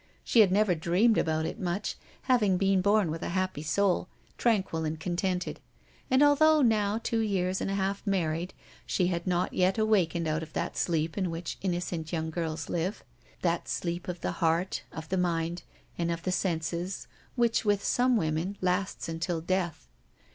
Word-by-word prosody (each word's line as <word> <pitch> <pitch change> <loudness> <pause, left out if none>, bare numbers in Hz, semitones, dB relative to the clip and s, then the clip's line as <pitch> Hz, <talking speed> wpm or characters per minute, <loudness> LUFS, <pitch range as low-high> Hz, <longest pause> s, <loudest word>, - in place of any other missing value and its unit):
She 235 - +3
had 205 -4 +7
never 205 -1 +3
dreamed 180 +7 +3
about 160 -1 0
it 165 - -4
much, 185 +3 -2 0.3
having 215 -8 +3
been 195 0 +3
born 200 -3 +3
with 165 +1 -4
a - - -3
happy 185 -5 -1
soul, 180 +3 +1 0.3
tranquil 195 -8 +1
and 155 0 -3
contented, 180 +2 -2 0.5
and, 260 +2 +5
although 300 +1 +5
now 215 -3 +2
two 230 0 -1
years 190 -4 0
and - - -1
a 195 - -1
half 195 0 -1
married, 175 -2 -1 0.3
she 180 -2 +1
had 170 +2 -4
not 180 0 0
yet 185 +2 +2
awakened 180 -7 +2
out 155 +1 0
of 160 -1 -9
that - - -2
sleep 165 +1 0
in 185 -2 0
which 165 +1 -5
innocent 175 -3 -2
young 160 -1 -2
girls 160 -1 -3
live, 175 +4 -2 0.4
that 170 -1 0
sleep 175 0 -3
of 175 -2 -5
the - - -1
heart, 170 +3 +1
of 160 0 -7
the 190 - 0
mind, 170 -1 0 0.4
and 170 0 0
of 165 0 -4
the 185 - -1
senses, 175 0 -2 0.3
which, 235 -2 +2
with 205 -2 +1
some 250 0 +3
women, 165 +3 -1
lasts 185 +1 -1
until 165 +1 -2
death. 175 0 -2
180 Hz, 175 wpm, -29 LUFS, 165-200 Hz, 0.5 s, had